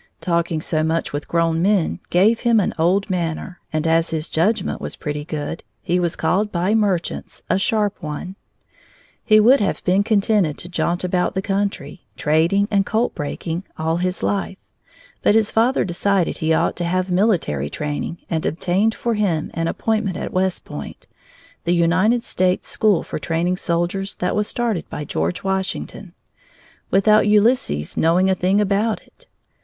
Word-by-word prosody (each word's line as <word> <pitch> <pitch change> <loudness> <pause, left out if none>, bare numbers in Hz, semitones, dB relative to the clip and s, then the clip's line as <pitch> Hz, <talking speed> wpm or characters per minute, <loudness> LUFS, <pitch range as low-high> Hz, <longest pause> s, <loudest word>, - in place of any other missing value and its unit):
Talking 170 -2 0
so 155 -1 0
much 160 -1 -1
with 145 +1 -4
grown 165 -1 +1
men 195 -2 +1
gave 210 +6 +3
him 235 -2 +3
an 195 - 0
old 190 +5 +2
manner, 175 0 -3
and 155 0 -1
as 165 0 +2
his 160 -1 -3
judgment 190 +5 0
was - - -5
pretty 150 -1 -4
good 155 +1 -5 0.2
he 180 +1 +1
was 175 -2 0
called 210 +3 0
by 180 +4 0
merchants 200 -6 -1
a 185 - +2
"sharp 210 -1 0
one." 155 +4 -6 0.9
He 215 -1 +5
would 245 +6 +6
have 200 - -1
been 185 +2 +3
contented 205 -6 +1
to - - -9
jaunt 175 0 -1
about 180 0 0
the 190 - 0
country, 195 -8 -2 0.2
trading 165 +7 +2
and 200 -1 +3
colt 225 +4 0
breaking, 165 +4 -4
all 160 +1 0
his 180 +1 -2
life, 195 -1 -1 0.6
but 205 - +3
his 220 -1 +3
father 235 +4 +2
decided 190 0 0
he 160 0 0
ought 160 - +2
to 175 - -1
have 185 +1 -1
military 180 - +1
training 150 - -4
and 160 -1 -2
obtained 190 +7 +1
for 235 - -1
him 190 -8 0
an 165 0 -1
appointment 215 -1 -1
at - - -5
West 185 0 0
Point 75 - -8 0.6
(the 175 +1 +1
United 185 +8 +2
States' 185 0 0
school 210 -5 +2
for - - -5
training 170 +3 -1
soldiers 175 +2 -1
that 180 - -1
was 210 0 0
started 230 -7 -2
by 150 - -5
George 85 - -2
Washington) 190 -1 -3 0.7
without 210 +2 +4
Ulysses 210 - +2
knowing 180 +4 +3
a - - +4
thing 185 +2 +1
about 210 +2 0
it. - - -20
185 Hz, 165 wpm, -21 LUFS, 165-205 Hz, 0.9 s, would